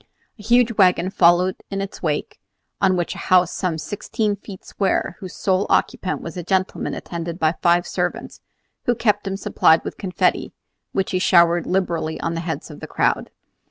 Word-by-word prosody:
A - - -10
huge 240 +2 +3
wagon 185 -1 +4
followed 180 +1 +4
in 195 - -3
its 195 0 -6
wake, 150 -4 -2 0.4
on 185 -2 +3
which 175 - -1
was - - -8
a - - -8
house 180 -1 +4
some 180 -4 -2
sixteen 210 +4 -2
feet 200 -1 -11
square, 190 -2 -1
whose 185 -3 -8
sole 190 0 0
occupant 185 - 0
was 165 - -7
a 180 - -4
gentleman 185 +2 -1
attended 170 -1 -5
by 155 -3 +2
five 175 +1 +3
servants, - - -3 0.4
who 245 - +2
kept 210 -3 +1
him 195 0 -2
supplied 160 -4 +3
with - - -6
confetti, 185 -2 0 0.4
which 190 -1 -1
he 185 - 0
showered 170 -2 +4
liberally 170 -4 -1
on 165 - -2
the 165 - -3
heads 165 -1 -5
of - - -11
the - - -8
crowd. - - 0
185 Hz, 185 wpm, -21 LUFS, 170-195 Hz, 0.4 s, wagon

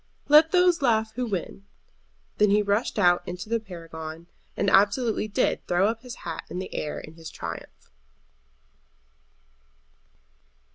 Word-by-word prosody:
"Let 305 +2 +7
those 360 -3 +4
laugh 220 -4 +2
who 250 +1 -2
win." 195 0 -5 0.7
Then 210 0 +5
he 210 +1 +3
rushed 205 +4 0
out 175 -3 +4
into 180 +4 -6
the 230 0 +1
Paragon, 165 -4 -9 0.3
and 200 - 0
absolutely 210 +3 +3
did 200 - 0
throw 190 +5 +2
his 240 +2 -10
hat 165 -2 -4
up - - -29
in - - -6
the 185 - -5
air 150 - -3
in 155 - -11
his 165 -1 -10
triumph. - - -9
205 Hz, 140 wpm, -26 LUFS, 175-230 Hz, 0.7 s, Let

